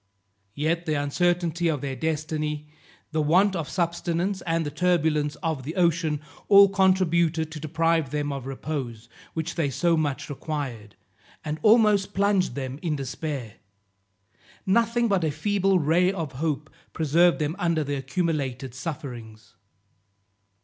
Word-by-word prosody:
Yet 165 +4 -1
the 155 - +1
uncertainty 170 +3 0
of 150 -5 0
their 135 -2 -3
destiny, 150 -1 -3 0.4
the 155 0 0
want 185 +6 +3
of 165 -4 -3
subsistence, 170 +2 -1
and 165 -1 +1
the 145 - -3
turbulence 155 -4 +1
of 160 -5 -1
the 150 +6 -6
ocean, 165 -4 +1 0.3
all 200 -1 +8
contributed 170 -4 +2
to 155 - -6
deprive 160 -1 +1
them 145 +1 -2
of 135 -2 -6
repose, 130 -5 -5 0.3
which 160 +1 -2
they 160 -5 0
so 170 +6 +2
much 145 -4 -1
required, 135 -8 -5 0.5
and 155 +1 -3
almost 210 -3 +4
plunged 200 -1 +2
them 135 0 -5
in 165 -4 -1
despair. 135 -3 -5 1.1
Nothing 235 +4 +2
but 195 -5 +1
a 160 - +2
feeble 195 +5 +1
ray 175 +3 +3
of 165 -7 -4
hope 150 +2 -3 0.2
preserved 165 +3 +3
them 155 +1 -2
under 170 -3 +1
their 145 -1 -2
accumulated 135 -4 -2
sufferings. 120 -7 -7
160 Hz, 135 wpm, -25 LUFS, 145-175 Hz, 1.1 s, all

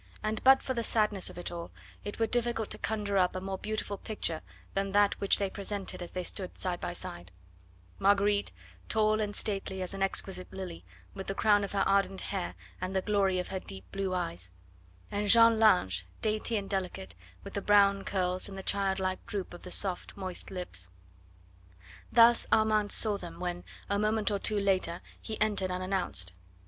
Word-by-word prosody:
And 215 0 -2
but 265 0 +7
for 260 - -1
the 235 - -1
sadness 210 -4 +2
of - - -11
it 175 - -4
all 170 -1 -6 0.3
it 205 - -5
were 225 - +2
difficult 235 -1 -1
to - - -2
conjure 205 -3 0
up 180 0 +2
a - - -1
more 190 0 -4
beautiful 215 -2 -3
picture 170 -7 -3 0.3
than 195 0 -1
that 205 0 +5
which 200 - +4
they 200 - 0
presented 195 -1 -4
as 175 - -5
they 185 - -4
stood 185 0 -6
side 180 -2 -1
by 175 - -3
side; 90 - -7 0.7
Marguerite, 200 - +3 0.4
tall 215 0 +3
and 205 -1 -2
stately 195 -2 -3
as 185 0 -3
an 195 - -6
exquisite 195 -1 -1
lily, 185 -3 -6 0.3
with 195 - -7
the 195 - -2
crown 205 -1 +4
of 200 - -4
her 195 -1 +2
ardent 195 -1 +2
hair 190 -3 -3 0.3
and 185 +1 -3
the 190 - +1
glory 195 -3 +2
of 180 - -2
her 190 - -3
deep 95 - -9
blue 195 -1 -1
eyes, 90 - -3 0.6
and 205 +1 -1
Jeanne 230 +1 +7
Lange, 180 - +4 0.2
dainty 215 +1 +1
and 200 -1 -3
delicate, 190 -1 -3 0.3
with - - -9
the 200 - -2
brown 200 -1 +5
curls 185 0 0
and 195 - -8
the 190 - -6
child 195 -1 +1
like 185 -1 -2
droop 195 -4 -3
of 175 - -10
the 180 - -9
soft, 185 0 -1
moist 185 -2 -5
lips. 175 - -4 1.2
Thus 235 0 +6
Armand 215 -2 +3
saw 210 -2 +2
them 170 -3 -8
when, 175 -1 -3 0.2
a 200 0 0
moment 215 0 +2
or 200 - 0
two 210 0 +1
later, 185 -3 +1 0.2
he 220 -1 -5
entered 205 -3 +2
unannounced. 180 - -1
195 Hz, 190 wpm, -30 LUFS, 185-210 Hz, 1.2 s, but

